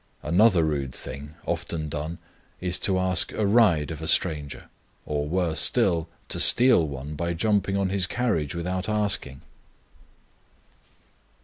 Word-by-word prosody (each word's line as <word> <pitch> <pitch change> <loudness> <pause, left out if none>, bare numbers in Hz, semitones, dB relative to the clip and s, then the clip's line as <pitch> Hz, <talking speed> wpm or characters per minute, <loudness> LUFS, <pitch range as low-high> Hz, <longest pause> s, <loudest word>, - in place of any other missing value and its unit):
Another 95 -1 +4
rude 70 -4 -2
thing 75 +3 -7
often 80 -2 -3
done 80 +2 -5 0.4
is 90 0 -1
to 95 0 +1
ask 95 0 +1
a 105 - -1
ride 100 - +3
of 80 -1 -7
a 80 - -5
stranger, 75 -7 -1 0.4
or, 75 -1 -2
worse 85 -3 0
still, 85 -1 +2 0.2
to - - -2
steal 120 -10 +6
one 70 +1 -7
by 85 +3 -3
jumping 100 +1 0
on 100 -1 0
his 95 -1 +1
carriage 95 - -1
without 90 +4 -3
asking. 100 -10 -1
85 Hz, 135 wpm, -25 LUFS, 75-95 Hz, 0.4 s, steal